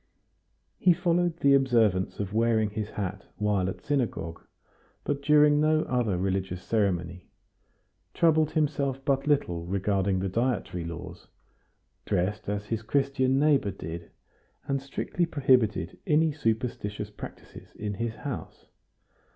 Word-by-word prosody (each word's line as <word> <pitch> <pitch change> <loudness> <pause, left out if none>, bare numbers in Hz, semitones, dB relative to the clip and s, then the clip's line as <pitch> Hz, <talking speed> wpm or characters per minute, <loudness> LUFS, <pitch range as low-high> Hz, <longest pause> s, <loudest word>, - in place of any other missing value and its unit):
He 180 - +5
followed 175 -1 +1
the 140 -4 +4
observance 115 -9 +2
of 100 -1 -3
wearing 110 -2 +2
his 105 0 -4
hat 100 -1 -4
while 105 -3 +1
at - - -7
synagogue, 125 - -2 0.6
but 140 -1 -2
during 150 0 +5
no 155 +1 +3
other 120 -7 0
religious 95 -1 -2
ceremony; 90 -5 -1 0.9
troubled 160 -2 +4
himself 140 -3 0
but 135 +1 +1
little 90 - +1
regarding 95 0 0
the 95 +1 -1
dietary 95 -5 -1
laws; 85 0 -8 0.8
dressed 100 +4 -1
as 105 0 -2
his 110 0 -2
Christian 135 +2 +1
neighbor 140 -6 +3
did; 85 -3 -7 0.6
and 135 -1 0
strictly 150 +5 -2
prohibited 130 -8 +2
any 155 +1 +3
superstitious 110 -6 -2
practices 105 - -11
in 105 -1 -4
his 115 +2 -3
house. - - -7
115 Hz, 125 wpm, -27 LUFS, 95-140 Hz, 0.9 s, He